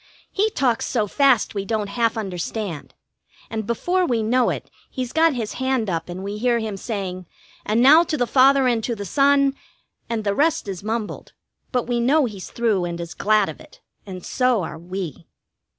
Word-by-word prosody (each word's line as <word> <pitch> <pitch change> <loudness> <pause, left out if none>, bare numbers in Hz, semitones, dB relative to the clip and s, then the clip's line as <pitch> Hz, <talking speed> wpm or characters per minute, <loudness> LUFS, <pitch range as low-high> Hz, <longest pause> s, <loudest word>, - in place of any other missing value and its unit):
He 420 +2 +1
talks 250 - 0
so 225 -4 0
fast 265 +2 +3
we 200 -2 -2
don't 210 -1 -2
half 230 +1 0
understand, 190 -3 -4 0.6
and 220 -2 -3
before 355 +11 0
we 235 -9 0
know 245 +3 +2
it - - -5 0.2
he's 255 -2 -5
got 320 -2 +4
his 225 -3 -3
hand 260 -6 0
up 165 0 -3
and 180 +2 -6
we 205 +1 -5
hear 240 0 +2
him 220 -3 -3
saying: 190 -4 -5 0.4
"And 220 +3 +3
now 300 +5 +8
to 310 - -2
the 245 - +1
Father 270 +1 +5
and 235 -3 +1
to 235 - -2
the 200 -2 -6
Son 275 +4 +3 0.3
." - - -47
And 230 -2 -2
the 200 -1 0
rest 295 0 +1
is 190 -3 -5
mumbled, 220 0 -4 0.4
but 250 -2 +1
we 240 0 -1
know 275 +5 +3
he's 200 -6 -7
through 220 -6 0
and 170 -1 -4
is 170 0 -6
glad 215 -1 +2
of - - -8
it, - - -17 0.2
and 185 -3 -9
so 250 -6 +1
are 160 - -6
we. 175 -2 -6
225 Hz, 200 wpm, -22 LUFS, 200-255 Hz, 0.6 s, now